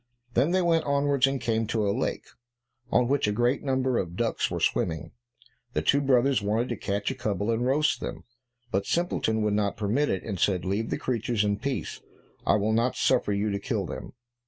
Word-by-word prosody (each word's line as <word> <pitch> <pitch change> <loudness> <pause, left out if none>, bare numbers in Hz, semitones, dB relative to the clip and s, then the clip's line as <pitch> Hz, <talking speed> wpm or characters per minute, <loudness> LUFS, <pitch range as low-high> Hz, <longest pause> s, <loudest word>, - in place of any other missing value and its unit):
Then 130 +7 +3
they 185 +1 +2
went 165 -2 +2
onwards 140 -1 +2
and 135 0 -1
came 115 -2 0
to 110 -2 0
a 100 - +2
lake, - - -2 0.6
on 125 0 +3
which 140 -3 +1
a - - +1
great 120 +5 +1
number 130 -2 +1
of 85 -2 -4
ducks 115 +3 0
were - - -3
swimming. 80 -3 0 0.6
The 75 - 0
two 140 - +3
brothers 135 -2 +3
wanted 110 +5 0
to 120 - -1
catch 100 +2 -2
a - - -2
couple 105 -4 -1
and 115 +1 0
roast 145 +4 +2
them, - - -6 0.5
but 100 +1 0
Simpleton 110 -10 0
would 105 -1 +1
not 105 -1 0
permit 110 +8 +1
it, 95 - -1
and 100 -5 -4
said, 95 -3 +1
"Leave 100 +4 -1
the - - -1
creatures 120 -3 -1
in 100 -1 0
peace, 140 +2 -3 0.5
I - - +5
will 105 +1 +1
not 115 +3 +1
suffer 125 -5 +2
you 100 +1 0
to 100 - -1
kill 105 -3 -2
them." - - -7
115 Hz, 205 wpm, -27 LUFS, 100-130 Hz, 0.6 s, I